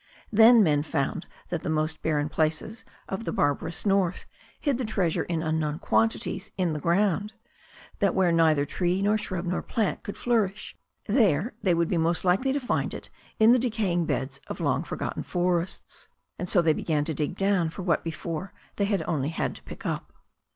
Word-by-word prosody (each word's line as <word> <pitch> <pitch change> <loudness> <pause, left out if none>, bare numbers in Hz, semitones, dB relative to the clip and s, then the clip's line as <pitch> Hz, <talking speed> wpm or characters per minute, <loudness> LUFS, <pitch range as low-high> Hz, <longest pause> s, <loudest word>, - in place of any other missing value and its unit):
Then 225 +1 +7
men 150 -5 +3
found 155 +2 -2 0.2
that 170 -3 -2
the - - -4
most 155 0 -1
barren 150 -2 0
places 155 +8 -1 0.2
of 195 +4 -4
the - - -3
"barbarous 160 +6 0
north" 195 -3 +1 0.3
hid 280 -5 0
the - - -1
treasure 195 -7 0
in 165 -2 -2
unknown 155 -1 -1
quantities 210 0 0
in 180 -4 +1
the 150 - -3
ground; 200 +5 +1 0.7
that - - +2
where 185 -2 +3
neither 160 -3 +3
tree, 180 +5 0
nor 205 +1 +3
shrub, 185 -4 -3
nor 175 +1 -1
plant 220 -4 -1
could 205 - -7
flourish 215 -5 -1 0.3
there 210 - +2
they 180 -4 +2
would 170 0 0
most 170 +1 +1
likely 195 +10 +2
find 260 -3 -1
it - - -10 0.3
in 220 +1 +7
the 250 - +5
decaying 210 -8 0
beds 135 +1 -2
of - - -6
long - - +1
forgotten - - -4
forests. 175 0 -2 0.3
And 180 - -3
so 175 - +4
they 160 -1 +4
began 150 -2 -1
to 160 - -2
dig 150 +3 -2
down 195 -4 +2
for 180 +3 -7
what 170 -4 +1
before 165 +2 -5 0.2
they 200 - +2
had 200 -1 0
only 145 -4 -1
to 165 - -3
pick - - -10
up. - - -3
175 Hz, 180 wpm, -27 LUFS, 160-205 Hz, 0.7 s, Then